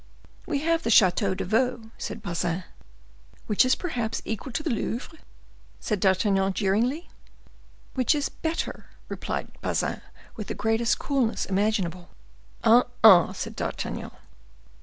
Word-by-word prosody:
"We 285 -3 -1
have 330 +1 +1
the 230 - -2
Chateau 195 -2 +4
de - - -3
Vaux," 230 +3 0
said 220 - -6
Bazin. 175 0 -2 0.8
"Which 210 - +4
is 255 - +3
perhaps 240 -11 -3
equal 225 +4 -4
to 305 - -2
the 310 - -1
Louvre?" 245 +7 -4 0.6
said 210 -3 -2
D'Artagnan, 195 0 +2
jeeringly. 230 - 0 0.8
"Which 255 +2 +2
is 290 -2 0
better," 325 +1 -4 0.2
replied - - -4
Bazin, - - -1 0.3
with 215 - -6
the - - -4
greatest 225 +1 +1
coolness 265 -6 0
imaginable. 190 -3 -1 0.5
"Ah, 235 +2 +6 0.2
ah!" 190 -6 +8
said - - -6
D'Artagnan. - - -4
225 Hz, 130 wpm, -26 LUFS, 195-255 Hz, 0.8 s, ah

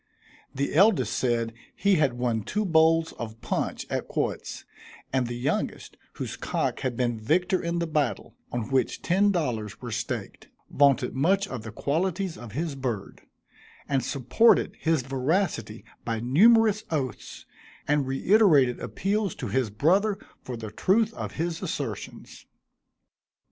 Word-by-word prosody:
The 140 +1 -1
eldest 195 +6 +4
said, 115 -2 0 0.2
he 200 -2 +3
had 145 -5 +2
won 120 -2 -1
two 210 - -2
bowls 160 -1 +4
of 115 -1 -6
punch - - -2
at - - -3
quoits; - - -3 0.5
and 130 -2 +1
the 120 0 -4
youngest, 130 +4 -2 0.2
whose - - -5
cock - - -2
had 125 -3 -3
been 120 -3 0
victor 180 - +1
in 170 0 -2
the 170 - 0
battle, 150 -5 -1 0.2
on 120 +1 -3
which 135 -1 0
ten 200 +4 +3
dollars 120 - -2
were - - -7
staked, - - -4 0.2
vaunted 140 -3 +3
much 190 +9 +2
of 130 -8 -5
the 110 0 -8
qualities 175 - -1
of 120 -4 -10
his 160 +3 -2
bird; 125 -7 -4 0.7
and 135 -2 0
supported 140 - +3
his 160 -5 +1
veracity 135 - -1 0.2
by 115 -1 -2
numerous 215 - +5
oaths, 135 -7 -4 0.4
and 145 -2 +2
reiterated 145 - +4
appeals 200 0 -1
to - - -5
his 130 -4 0
brother 190 - +2 0.2
for 125 -2 -6
the 110 -2 -7
truth 215 - +2
of - - -6
his 165 0 -3
assertions. - - -6
140 Hz, 145 wpm, -26 LUFS, 120-185 Hz, 0.7 s, numerous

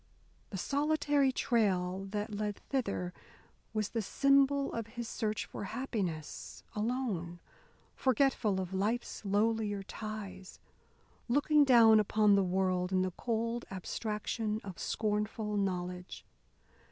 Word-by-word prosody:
The 195 - -5
solitary 290 - +2
trail 195 -6 +1
that 210 +1 -3
led 205 0 -2
thither 200 -10 -2 0.6
was 215 -2 -1
the 230 - -1
symbol 275 +4 +3
of 230 -2 -3
his 235 -1 -3
search 215 -1 -2
for - - -6
happiness 195 - -4
alone, 210 -7 -2 0.5
forgetful 255 -6 +2
of 185 0 -4
life's 215 +6 -1
lowlier 205 0 +1
ties, 205 -3 -7 0.7
looking 290 +4 +4
down 230 -5 +7
upon 210 0 +4
the 200 - +5
world 185 0 0
in 185 0 +3
the 185 - -1
cold 230 +3 -2
abstraction 210 +3 -3
of 190 -3 -8
scornful 210 0 -1
knowledge. 180 -2 -3
210 Hz, 115 wpm, -32 LUFS, 190-235 Hz, 0.7 s, down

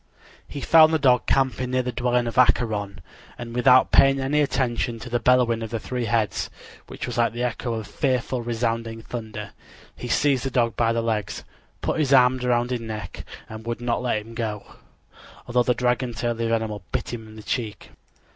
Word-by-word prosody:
He 140 - -7
found 160 +1 +6
the 160 - +3
dog 130 -4 +3
camping 130 -2 +1
near 130 0 +1
the 125 - -2
dwelling 125 0 0
of 115 +1 -1
Acheron, 105 -6 +2 0.4
and 120 -1 -7
without 125 +1 +5
paying 135 0 +5
any 140 +3 +1
attention 125 -4 -1
to 120 +2 -9
the 120 - +1
bellowing 125 -2 +3
of 110 - -4
the 115 0 -3
three 125 +2 -3
heads, 110 -2 0 0.4
which - - -6
was 120 -1 -4
like 115 0 +2
the 120 +1 -3
echo 120 -1 -2
of 110 -1 -5
fearful 125 +1 -1
resounding 115 -1 -2
thunder, 110 -3 -7 0.4
he 125 - -7
seized 135 +1 +2
the 135 - -1
dog 120 -3 +1
by 115 -1 +2
the 115 0 0
legs, 110 -3 -2 0.4
put - - -1
his 140 -3 +2
arms 125 -1 +5
around 120 0 +1
his 125 -2 -2
neck, 110 -4 -6 0.2
and 110 +1 -9
would 120 0 -3
not 120 0 -1
let 110 -4 -1
him 115 - -12
go, 110 -3 -5 0.7
although 125 +1 +2
the 125 0 +1
dragon 125 0 0
tail 120 +2 -1
of 115 - -5
the 115 -1 0
animal 110 -3 -1
bit - - -3
him 110 -2 -7
in 110 - -13
the 110 - -10
cheek. 110 -5 -4
120 Hz, 205 wpm, -24 LUFS, 115-125 Hz, 0.7 s, found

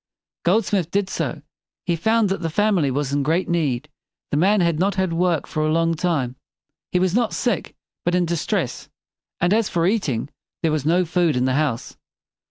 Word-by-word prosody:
Goldsmith 190 -2 +2
did 200 +1 -1
so. - - -3 0.4
He 175 - +1
found 220 +5 +2
that 195 - -2
the 165 - -1
family 190 -4 +2
was 140 +1 -1
in 145 - +2
great 160 +6 +1
need. 150 -6 0 0.4
The 145 - +1
man 200 +6 +4
had 170 -3 +1
not 195 +2 +1
had 190 -3 0
work 170 -2 +1
for 155 - -2
a 155 - +1
long 165 +1 +2
time. 155 -7 -1 0.5
He - - +2
was 185 0 +1
not 235 0 +1
sick, 235 -6 -1 0.3
but 175 +1 +1
in 180 -1 +2
distress; 170 -1 -2 0.5
and, 175 +3 +2
as 225 -1 +2
for 170 -2 +1
eating, 165 - 0 0.3
there 160 - +2
was 150 -1 -1
no 175 +3 +3
food 170 -3 +1
in 125 - +2
the 130 - +1
house. 140 -5 -1
170 Hz, 190 wpm, -22 LUFS, 155-190 Hz, 0.5 s, man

